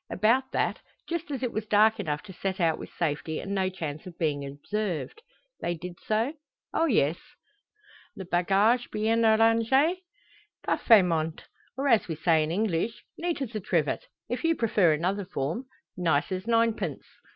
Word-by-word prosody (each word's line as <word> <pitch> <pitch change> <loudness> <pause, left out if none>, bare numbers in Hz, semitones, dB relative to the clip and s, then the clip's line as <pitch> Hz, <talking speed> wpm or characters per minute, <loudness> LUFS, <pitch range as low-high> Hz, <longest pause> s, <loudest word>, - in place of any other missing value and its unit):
"About 240 +6 +2
that; - - 0 0.3
just 340 0 -3
as 270 -3 -4
it 245 - 0
was 215 0 -4
dark 215 +1 +4
enough 150 -1 -2
to 190 - -11
set 190 +2 -3
out 165 -2 +2
with - - -8
safety, 155 -1 -2
and 200 - -4
no 190 -1 +1
chance 160 -4 -6
of 175 - -11
being 145 -3 -1
observed." 195 - -4 0.4
"They 175 - -2
did 175 +1 -8
so?" 225 +6 +1 0.4
"Oh, 325 - +2
yes." 170 - +2 1.0
"Le 190 - -7
bagage 195 +8 +2
bien 225 +2 +1
arrange?" 225 +1 +4 1.0
"Parfaitment; 165 -8 +3 0.3
or 275 +2 0
as 230 -5 +4
we 165 - -3
say 160 0 +3
in 155 - -1
English, 205 +3 -1 0.2
neat 340 -4 -1
as 240 -3 -7
a 215 - -2
trivet. 165 -6 -1 0.2
If 245 +6 -3
you 330 0 +3
prefer 210 - +3
another 185 +6 0
form; 175 - -3 0.3
nice 165 -3 +1
as 185 +3 -3
ninepence." 230 -1 +1
195 Hz, 165 wpm, -27 LUFS, 165-230 Hz, 1.0 s, dark